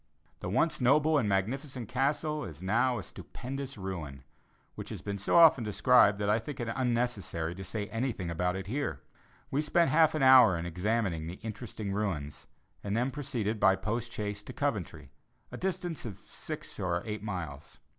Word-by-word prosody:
This - - -4
once 165 -4 +1
noble 150 +4 +4
and 110 -6 0
magnificent 120 +6 -2
castle 150 +4 0
is 80 0 -8
now 120 +6 +2
a 100 - -5
stupendous 135 +7 -7
ruin, 80 -9 -6 0.5
which - - -8
has - - -6
been 100 -1 -4
so 95 - 0
often 160 -7 +7
described 105 -1 +4
that 100 0 -1
I 105 +2 +3
think 135 +5 -7
it 120 - -3
unnecessary 115 -10 -1
to 95 +2 -8
say 105 +2 -3
anything 115 -6 -2
about 90 +2 0
it 95 0 -4
here. 100 - -3 0.5
We 140 - +1
spent 165 +3 +2
half 160 0 +5
an 150 - +1
hour 130 -8 +8
in 85 - -4
examining 90 -2 -1
the 85 - -5
interesting 110 -2 -5
ruins, 85 -9 -3 0.4
and 100 +2 -1
then 125 +3 +1
proceeded 125 -7 -2
by 95 -2 +5
post 115 +4 -3
chaise 105 -2 -4
to - - -8
Coventry, - - -3 0.4
a - - -6
distance 180 -3 -3
of 105 -5 -6
six - - -7
or 85 -1 -1
eight 105 -1 -4
miles. 85 -10 -6
110 Hz, 175 wpm, -30 LUFS, 95-130 Hz, 0.5 s, hour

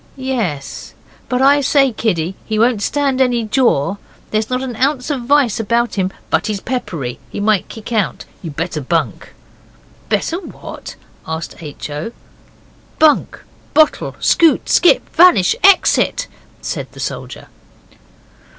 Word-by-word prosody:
'Yes 230 - -4 0.3
but 250 +1 +1
I 285 +1 +5
say, 275 -1 +3
kiddie, 185 -6 -1
he 220 - -3
won't 230 -1 +2
stand 275 +2 0
any 245 -2 +2
jaw. 215 - +1 0.3
There's 215 0 0
not 255 +1 -1
an 250 -3 -5
ounce 270 +2 0
of 270 -4 -2
vice 270 -4 +3
about 235 +2 0
him, 190 -2 -1 0.2
but - - +1
he's 210 -2 -2
peppery. 165 - -4
He - - -6
might 205 -2 +1
kick 225 +1 -8
out. 215 -4 -1 0.2
You'd 160 -5 -7
better 165 -1 -3
bunk.' 165 +5 -2 0.8
'Better 335 - 0
what?' 380 - -10 0.3
asked 160 +1 -6
H. 150 -1 -7
O. 155 +11 -5 0.8
'Bunk, 310 -2 +2 0.3
bottle, 310 0 +3
scoot, 330 -2 +3
skip, 355 +7 +4
vanish, 335 - +6
exit,' 395 +5 +4 0.4
said - - -4
the - - -13
soldier. - - -6
235 Hz, 135 wpm, -17 LUFS, 185-270 Hz, 0.8 s, vanish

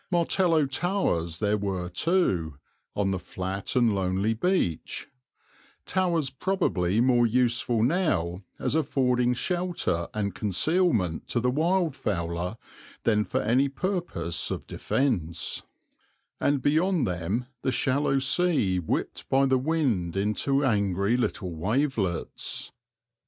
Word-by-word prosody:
Martello 170 -2 +3
towers 135 - -1
there 105 +1 +1
were 95 -3 -2
too, 90 - +1 0.4
on 100 -1 +1
the 95 - -1
flat 95 +4 -5
and 120 -4 +4
lonely 95 +3 0
beach, 115 - -1 0.8
towers 170 -7 0
probably 130 - 0
more 120 -1 +4
useful 120 -1 +1
now 115 - +1 0.2
as - - -1
affording 125 -5 +2
shelter 175 - -1
and 100 -3 -2
concealment 105 - +1
to 120 - 0
the 125 +1 +1
wild 165 +2 +1
fowler 85 0 -2 0.5
than 105 -2 +3
for - - -2
any 130 +6 +3
purpose 175 - -2
of - - -4
defence; 90 - -1 0.8
and 140 -2 +1
beyond 165 +2 +2
them 90 +7 -2 0.2
the 130 - 0
shallow 135 +2 +1
sea 135 - +2
whipped 80 - -3
by 135 +1 +4
the 130 -1 +3
wind 125 - 0
into 135 +8 +1
angry 100 -2 +1
little 105 -6 -1
wavelets. 105 - -2
120 Hz, 115 wpm, -27 LUFS, 95-150 Hz, 0.8 s, and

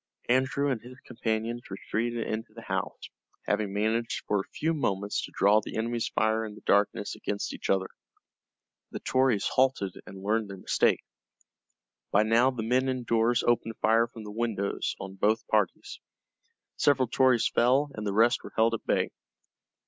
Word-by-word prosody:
Andrew 130 +3 +2
and 120 -4 -2
his 125 +2 -13
companions 115 0 -3
retreated 115 +4 -2
into 110 0 -5
the 115 - -10
house, - - -3 0.4
having 105 -1 0
managed 110 +3 -1
for 105 - +1
a 95 - -6
few 160 +1 -1
moments 100 -9 -1
to - - -7
draw 105 +2 +5
the - - -7
enemy's 115 +1 -1
fire 110 +1 +1
in 105 -2 -7
the - - -14
darkness 100 0 +2
against 100 0 -4
each - - -6
other. 95 -1 +2 1.0
The - - -6
Tories 130 -6 +2
halted 130 -8 +1
and 95 0 -10
learned 110 +1 0
their 100 - -7
mistake. - - +1 1.1
By 105 - +4
now 115 +4 +4
the 125 -4 -4
men 130 +3 +1
indoors 120 -2 +1
opened 115 -1 +1
fire 115 +1 +3
from 115 -1 -11
the 105 - -8
windows 105 -3 -2
on 95 0 -8
both 110 +3 +1
parties. 105 -4 -1 0.8
Several 130 -3 +3
Tories 130 -1 +3
fell, 135 +4 +2
and 110 - -6
the - - 0
rest 115 +4 +3
were - - -10
held 115 +1 +3
at 115 - -3
bay. - - +1
115 Hz, 165 wpm, -28 LUFS, 105-120 Hz, 1.1 s, draw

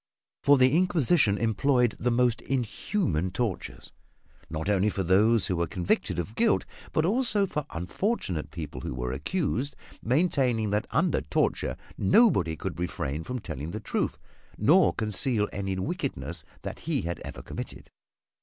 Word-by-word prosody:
For 145 0 +6
the 130 +2 +5
Inquisition 160 - +3
employed 120 +2 +2
the 125 - +1
most 120 -1 +2
inhuman 125 - -1
tortures, 110 -1 -3 0.6
not 80 +2 -4
only 100 0 +3
for 100 -2 -2
those 105 +4 +4
who 90 - 0
were 85 0 0
convicted 90 0 0
of 85 +5 -3
guilt, 225 - +2 0.3
but 155 - +2
also 215 0 +2
for 150 -6 -4
unfortunate 90 - -2
people 80 -3 -6
who - - -4
were 60 0 -2
accused, 140 - -1 0.3
maintaining 125 - +2
that 105 +3 0
under 165 0 +2
torture 75 - 0 0.2
nobody 100 - +4
could 75 +1 -5
refrain 80 -3 -3
from 125 +10 -4
telling 75 - -5
the 105 +5 -4
truth, 110 - -2 0.4
nor 160 - +5
conceal 105 0 0
any 95 -1 -2
wickedness 85 -3 -3 0.2
that - - -5
he - - -1
had 85 +1 -3
ever - - -8
committed. - - -7
110 Hz, 145 wpm, -28 LUFS, 85-140 Hz, 0.6 s, For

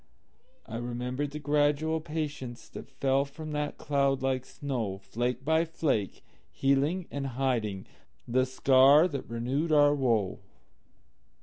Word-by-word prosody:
I 115 - -6
remembered 125 +4 -3
the 150 - -7
gradual 150 +2 +1
patienceThat 150 -6 -6
fell 135 0 +1
from 155 +2 -8
that 150 0 -3
cloud 140 -2 0
like 130 -1 0
snow, 120 -9 -3
Flake 120 +6 -3
by 160 +2 +3
flake, 155 - -2 0.3
healing 140 +7 +1
and 140 -1 -3
hidingThe 120 - -2
scar 135 +4 +5
that 140 -6 -6
renewed 130 +8 -1
our 145 -1 +5
woe. 115 -9 0
135 Hz, 115 wpm, -29 LUFS, 125-150 Hz, 0.3 s, scar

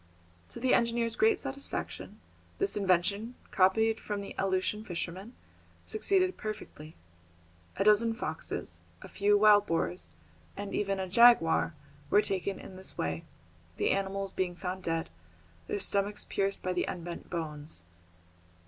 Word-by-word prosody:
To - - -9
the 255 +1 +2
engineer's 235 -1 +2
great 440 +1 +4
satisfaction, 275 0 -4 0.4
this 395 0 +1
invention, 200 +4 +1 0.2
copied 220 +4 +3
from 205 -1 -4
the 200 - -7
Aleutian 195 +2 0
fishermen, 185 +4 -5 0.5
succeeded 380 -3 +2
perfectly. 210 -7 -7 0.8
A 195 - +2
dozen 220 +2 +4
foxes, 225 - -4 0.2
a - - -8
few 205 0 +3
wild 205 -1 +6
boars, 90 - -1 0.5
and 200 0 -5
even 195 -1 0
a 190 - -2
jaguar, 190 -6 +5 0.3
were 210 - +5
taken 195 0 -2
in 185 - -10
this 190 - -4
way, 80 0 -2 0.5
the - - +2
animals 195 0 -1
being 180 -2 -1
found 185 0 -4
dead, 165 - -2 0.6
their - - -1
stomachs 200 +1 0
pierced 195 0 -1
by 185 - 0
the 180 - 0
unbent 175 -1 -6
bones. 150 - -5
195 Hz, 135 wpm, -30 LUFS, 180-220 Hz, 0.8 s, wild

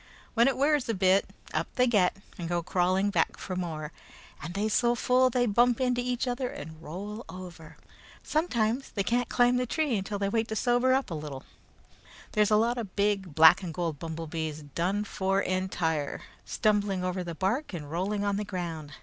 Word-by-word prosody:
When 235 +1 +4
it 270 - +1
wears 285 0 +2
off - - -10
a - - +2
bit, 190 +1 +3 0.2
up - - 0
they 250 - +4
get, 200 -7 +2 0.2
and 170 -2 -5
go 175 -1 0
crawling 185 +3 +1
back - - +1
for 185 - -5
more, 160 -4 -4 0.5
and 170 +4 -6
they 205 +2 0
so 235 +2 +2
full 255 +2 +3
they 245 0 +1
bump 240 +3 +3
into 250 -1 +1
each 250 +1 -1
other 250 +1 -1
and 160 -4 -9
roll 200 +8 -6
over. 175 -4 -10 0.5
Sometimes 255 -6 0
they 200 - -2
can't 240 +4 0
climb 245 0 +3
the 250 0 0
tree 300 -2 0
until 200 +1 -2
they 200 0 -1
wait 225 +2 0
to 220 - -4
sober 245 +3 +2
up 265 -6 0
a - - -1
little. 150 -4 -6 0.9
There's 210 -1 +3
a 215 - +4
lot 235 +3 +2
of 205 -5 -6
big 200 -5 0
black 160 +4 +8
and 180 -3 -5
gold 165 -3 -3
bumblebees, 160 -2 -4
done 190 +5 0
for 195 -1 0
entire, 180 -6 -1 0.2
stumbling 205 -4 +1
over 180 0 -2
the 170 -1 -6
bark 225 - -1
and 150 -5 -7
rolling 200 +4 -1
on 200 -1 0
the 210 - -1
ground. 170 -7 -5
200 Hz, 195 wpm, -28 LUFS, 175-240 Hz, 0.9 s, black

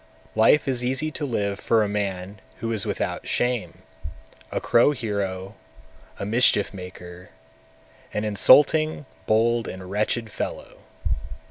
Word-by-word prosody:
244. 110 - +2
Life 150 +6 +5
is 125 -2 +1
easy 135 +5 -1
to 150 - -2
live 100 -6 -2
for 115 -2 +2
a - - -1
man 100 -1 -4 0.2
who 115 - -3
is 110 - 0
without - - -3
shame, 120 -9 -1 0.7
a - - -1
crow 120 +5 +4
hero, 100 -5 -3 0.6
a - - -4
mischief 105 -2 +3
maker, 90 -1 -10 0.8
an 105 - -2
insulting, 145 +9 +4 0.2
bold, 115 +1 +2
and 95 0 -8
wretched 110 +2 -1
fellow. - - -6
110 Hz, 130 wpm, -24 LUFS, 100-120 Hz, 0.8 s, Life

